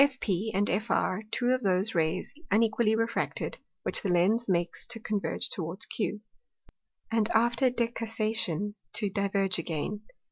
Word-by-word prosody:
FP, 225 -8 +2
and 205 +1 +2 0.2
FR 210 -3 0
two 245 +2 +1
of 255 0 +2
those 195 +1 +2
Rays 165 +1 0 0.2
unequally 220 +1 +3
refracted, 230 +1 -1 0.2
which - - +3
the 200 - -1
Lens 200 +7 +3
makes 175 -2 0
to 225 - -4
converge 210 -2 -2
towards 170 +2 -3
Q, 210 -1 -3 0.9
and 225 -1 +2
after 240 +3 +4
decussation 225 -5 -1 0.2
to 205 -3 -1
diverge 195 -2 +1
again. 170 +5 -3
210 Hz, 135 wpm, -29 LUFS, 185-230 Hz, 0.9 s, after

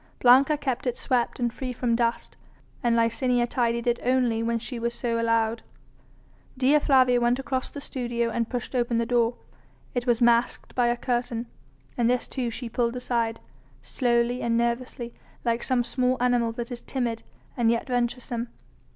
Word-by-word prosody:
Blanca 265 +5 +6
kept 260 -3 -2
it 245 - -1
swept 245 -1 0
and 240 -1 0
free 255 0 -4
from 240 -1 0
dust, 235 0 -1 0.5
and 240 -3 +2
Licinia 240 +1 +2
tidied 235 -1 0
it 240 -1 +1
only 245 -3 +1
when 230 0 0
she 235 +1 -5
was 235 +1 -2
so 230 -1 -1
allowed. 230 0 +1 1.0
Dea 275 +4 +4
Flavia 255 -4 +4
went 240 +1 +3
across 265 -1 -2
the 285 - -8
studio 240 -4 -2
and 230 0 -1
pushed 245 0 -4
open 240 -2 +1
the 230 - +1
door. 240 0 +2 0.6
It 245 -1 -2
was 235 -1 +3
masked 235 0 +2
by 245 -1 +2
a 240 0 +1
curtain, 240 -1 -2 0.5
and 235 -1 +3
this 250 0 0
too 250 -3 -2
she 240 +2 -5
pulled 235 +1 -1
aside, 235 -2 -1 0.4
slowly 240 -1 +1
and 230 -1 +1
nervously 235 0 -2 0.3
like 235 0 +1
some 255 -2 +1
small 255 +1 0
animal 245 -2 +2
that 240 +1 -6
is 240 - -5
timid 235 -4 -2 0.3
and 235 -2 +2
yet 230 0 +1
venturesome. 240 -1 -2
240 Hz, 170 wpm, -26 LUFS, 235-250 Hz, 1.0 s, Blanca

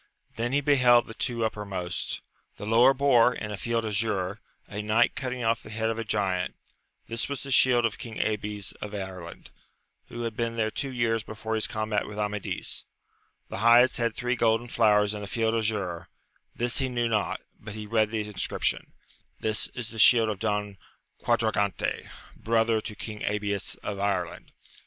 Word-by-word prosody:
Then 120 +2 -1
he 145 +2 +2
beheld 125 -4 +5
the 110 - -9
two 115 -1 -1
uppermost; 95 -5 -3 0.4
the - - -6
lower 115 +4 +6
bore, 130 -3 +4
in 105 - -5
a - - -2
field 115 +3 -1
azure, 100 -2 -1 0.3
a 105 +1 -4
knight 110 +3 +3
cutting 125 -2 -4
off 115 0 +1
the - - -12
head 110 +1 -1
of 115 - -4
a - - -1
giant; 95 -4 -1 0.5
this 115 +3 -3
was 140 - -4
the 140 - -6
shield 125 -2 +5
of 115 - -2
King 115 -6 -7
Abies 105 -2 -2
of 105 0 -5
Ireland, 95 -4 -7 0.6
who 120 0 -6
had 115 -2 -3
been 115 0 -2
there 110 -1 0
two 135 - -3
years 115 -3 0
before 110 +1 -5
his 110 -1 +2
combat 110 -1 -1
with 105 - -8
Amadis: 105 -1 -2 0.7
the - - -5
highest 120 +3 +6
had 115 -2 0
three 125 +1 0
golden 115 0 +2
flowers 105 -3 +3
in 105 - -5
a 100 - -6
field 115 +1 0
azure: 100 -7 -1 0.5
this 120 +2 +1
he 135 -1 0
knew 120 -1 0
not, 110 -3 0 0.2
but 105 0 -8
he 105 -1 -6
read 110 0 +2
the 110 -1 -2
inscription, 105 -3 -1 0.5
This 110 +1 -1
is 120 -3 -4
the 110 - -8
shield 115 0 +6
of 105 -3 -3
Don 105 -3 -2 0.4
'Quadragante, 110 -5 0 0.3
brother 115 0 +1
to 105 -1 -6
King 105 +1 -7
Abies 100 -1 -1
of 100 -1 -4
Ireland. 95 -4 -2
110 Hz, 180 wpm, -27 LUFS, 105-115 Hz, 0.7 s, lower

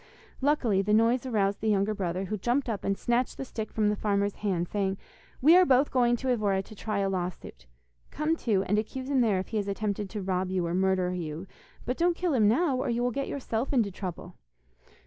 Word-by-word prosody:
Luckily, 255 -9 +2
the 210 +2 +2
noise 235 +4 +2
aroused 200 -4 0
the 220 - 0
younger 205 +1 +2
brother, 185 -1 -2
who 215 - -3
jumped 245 +7 0
up 215 -4 -3
and 195 0 0
snatched 240 +1 0
the 270 - -4
stick 220 -4 -6
from 215 -2 +1
the 210 - +1
farmer's 200 -1 0
hand, 180 -4 -1
saying: 195 -1 -1 0.5
'We 325 +5 +8
are 370 - +7
both 270 -1 +3
going 240 -2 +3
to 260 +2 -3
Evora 205 -5 +1
to 215 - -13
try 215 0 -3
a 200 -1 +1
law 180 -2 -1
suit. - - -13 0.4
Come 305 +2 0
too, 210 -11 0
and 210 +2 +1
accuse 260 +5 -5
him 265 -2 +3
there 215 -5 +2
if 185 - -4
he 220 - -2
has 205 -1 -1
attempted 200 0 -2
to 210 -1 -5
rob 185 0 -1
you 185 -2 0
or 170 - -2
murder 185 -1 +1
you, 165 -1 -5 0.4
but 250 +2 -2
don't 345 0 +2
kill 355 -4 0
him 220 -5 +4
now, 270 +4 +2
or 255 - -2
you 240 +1 0
will 245 - +1
get 275 +3 -3
yourself 250 -3 -3
into 230 -7 +2
trouble. 180 -1 -7
210 Hz, 230 wpm, -28 LUFS, 190-250 Hz, 0.5 s, We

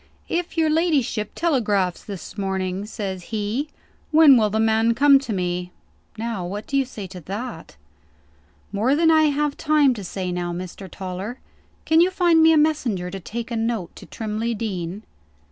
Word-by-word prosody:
'If 345 0 -3
your 320 -1 +3
ladyship 290 - +1
telegraphs 210 - 0
this 200 -2 -8
morning,' 190 0 -2
says 190 -5 -5
he, 220 +7 -2 0.4
'when 310 -3 +7
will 215 -3 +3
the 220 +2 -1
man 225 +1 +3
come 280 +2 +6
to 270 -4 -6
me?' 180 -2 -2 0.5
Now 225 -4 -3
what 205 +4 -5
do 275 - -4
you 275 -1 +3
say 220 -6 -8
to 185 0 -9
that?" 200 +2 -7 1.0
"More 220 +7 +2
than 325 +1 +4
I 315 -1 +5
have 295 0 0
time 300 -4 +3
to 210 -4 -7
say 185 0 -4
now, 175 0 -2
Mr. 185 +2 -7
Toller. 190 +6 -6 0.5
Can 320 +1 +5
you 355 - +4
find 345 -3 +3
me 320 0 +7
a 320 - +5
messenger 250 - +1
to 195 - -5
take 230 +6 -6
a - - -1
note 225 -5 -2
to - - -12
Trimley 225 +1 -3
Deen?" 195 -2 -4
220 Hz, 175 wpm, -23 LUFS, 190-285 Hz, 1.0 s, when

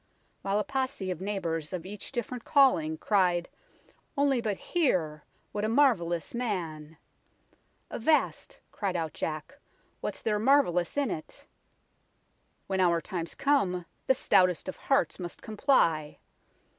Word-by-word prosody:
While 195 +1 0
a 210 - +1
posse 265 -8 -2
of 180 -1 -5
neighbours, 170 -5 -3
of 180 -2 -4
each 205 +1 -7
diff'rent 245 -1 -4
calling, 165 - +4
Cried 180 -4 +2 0.4
' - - -33
Only 275 -3 +3
but 210 -4 -1
hear! 165 - 0 0.3
what 205 - -3
a 215 - +1
marvellous 185 - +2
man; 165 -10 -3 0.4
' - - -38
' - - -34
Avast! 305 +7 +1
' - - -43
cried 195 -3 -2
out 160 -3 -2
Jack, 155 - -5 0.2
' - - -39
what's - - -4
there 210 -2 +1
marvellous 220 -7 +3
in 280 -7 +1
it? 155 - -7 1.2
When 190 -1 -2
our 170 -2 +4
time's 170 -2 -5
come, 190 -12 +1 0.2
the 265 - +5
stoutest 180 -7 +3
of 185 - -4
hearts 275 -5 +1
must 175 -1 -7
comply.' 170 - +2
195 Hz, 145 wpm, -29 LUFS, 170-250 Hz, 1.2 s, the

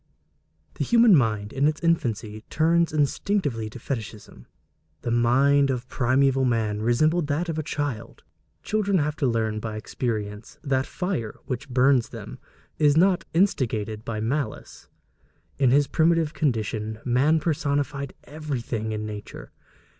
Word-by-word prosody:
The - - +2
human 235 -4 +6
mind 110 -6 0
in 140 +2 +2
its 155 0 -1
infancy 110 -10 -1
turns 170 +2 +2
instinctively 145 - 0
to 110 - -10
fetichism. 110 -4 -7 0.6
The 120 - -2
mind 135 +4 +3
of 125 -1 -2
primeval 135 +1 +2
man 110 -4 0
resembled 155 +8 +2
that 155 +4 -1
of 160 -1 -2
a - - +1
child. 145 -6 -4 0.4
Children 205 -2 +1
have 150 -1 0
to 140 - +1
learn 110 -2 0
by 110 0 -5
experience 105 -2 -4
that 135 -3 +1
the 130 - -4
fire 180 - -3
which 135 +1 -5
burns 125 -1 +3
them - - -9 0.4
is 150 -1 +4
not 185 +1 +3
instigated 110 - 0
by 115 -2 -4
malice. 120 +2 -4 0.7
In 135 -3 +4
his 140 +3 +4
primitive 165 0 +2
condition, 110 -6 -1
man 135 +6 +3
personified 145 -3 -2
everything 125 -7 -4
in 105 0 -3
nature. 105 -1 -8
135 Hz, 140 wpm, -25 LUFS, 115-155 Hz, 0.7 s, human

